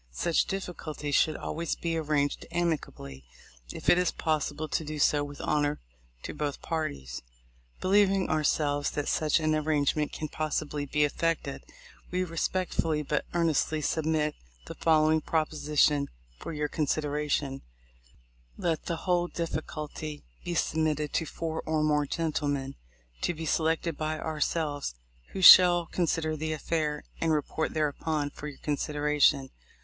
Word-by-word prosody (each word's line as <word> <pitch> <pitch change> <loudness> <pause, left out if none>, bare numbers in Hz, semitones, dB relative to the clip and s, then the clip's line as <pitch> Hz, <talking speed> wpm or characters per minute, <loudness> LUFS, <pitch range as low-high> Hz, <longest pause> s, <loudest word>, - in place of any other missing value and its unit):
Such 65 - +1
difficulties 155 -6 -4
should 155 +2 +3
always 165 0 -3
be 165 -1 -2
arranged 150 -3 0
amicably, 145 - -3 0.5
if - - -8
it 175 - +6
is 180 - +2
possible 155 -1 -1
to 160 - -1
do 155 0 -5
so 145 0 +3
with 145 0 -8
honor 145 0 0 0.4
to - - -5
both 145 -2 -3
parties. 70 - -3 0.6
Believing, 195 0 +3
ourselves, 145 -2 +1
that 145 - -3
such 155 +1 +2
an 155 -1 +1
arrangement 150 -1 +1
can 155 - -4
possibly 150 -1 -2
be 150 +2 +2
effected, 165 +3 -1 0.5
we 180 +1 0
respectfully 165 -2 -1
but 150 +1 -1
earnestly 160 -2 +2
sub 155 +1 -1
mit 155 -1 +1 0.3
the - - -7
following 155 -1 +3
proposition 150 -2 +1 0.3
for - - -6
your 150 -1 -1
consideration: 145 -2 -1 1.0
Let 165 -2 -1
the 170 - -3
whole 175 -1 +2
difficulty 155 -2 -5 0.2
be 175 - -3
submitted 155 -2 0
to 160 - 0
four 160 -1 -4
or 155 -1 0
more 150 -1 +2
gentlemen, 145 -4 -1 0.5
to 175 - 0
be 160 +1 -5
selected 160 0 0
by 155 0 -2
ourselves, 150 - -2 0.4
who 190 - -3
shall 175 -1 +10
con 175 +1 -1
sider 155 0 0
the 155 +1 -2
affair, 155 -1 -1 0.2
and 165 - +1
report 155 +1 -1
thereupon 150 -1 -1
for 150 - -8
your 145 -3 -8
considera 150 0 -1
tion. 135 -2 +4
155 Hz, 140 wpm, -29 LUFS, 145-165 Hz, 1.0 s, shall